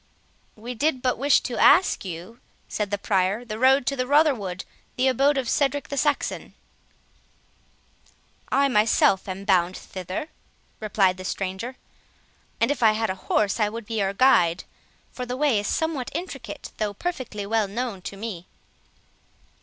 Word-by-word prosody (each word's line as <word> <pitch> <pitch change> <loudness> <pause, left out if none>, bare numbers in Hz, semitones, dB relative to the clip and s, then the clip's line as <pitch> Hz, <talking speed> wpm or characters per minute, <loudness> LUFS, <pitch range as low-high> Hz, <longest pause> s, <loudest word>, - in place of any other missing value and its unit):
"We 235 +3 -7
did 260 +1 0
but 250 -3 0
wish 280 +1 +4
to 240 - -4
ask 370 - +5
you," 185 +5 -8 0.3
said 210 -2 -3
the 205 - -1
Prior, 195 +3 0
"the 215 -2 -6
road 265 +1 +4
to 275 - 0
Rotherwood, 250 - +1 0.3
the 255 +1 +2
abode 275 +3 +3
of 260 -3 -1
Cedric 285 +2 0
the 280 - -3
Saxon." 290 +1 -1 2.0
"I 280 0 +4
myself 210 -5 +3
am 190 +1 -6
bound 185 -2 +2
thither," 185 - -6 0.5
replied 195 -4 +1
the 185 - -8
stranger; 195 +7 -4 0.8
"and - - +2
if 290 - -3
I 220 -2 +6
had 220 -1 -1
a 190 - -9
horse, 205 +1 +2
I 210 -1 +2
would 230 +1 -7
be 225 0 -3
your 195 -1 +1
guide, 185 -8 +4 0.5
for 250 -1 -6
the 250 +1 -3
way 280 -6 +2
is 205 - -3
somewhat 320 -6 -1
intricate, 275 - -6
though 210 -2 -2
perfectly 255 - -4
well 215 0 +1
known 220 -1 -4
to 195 - -7
me." 195 -5 -6
225 Hz, 155 wpm, -24 LUFS, 195-265 Hz, 2.0 s, I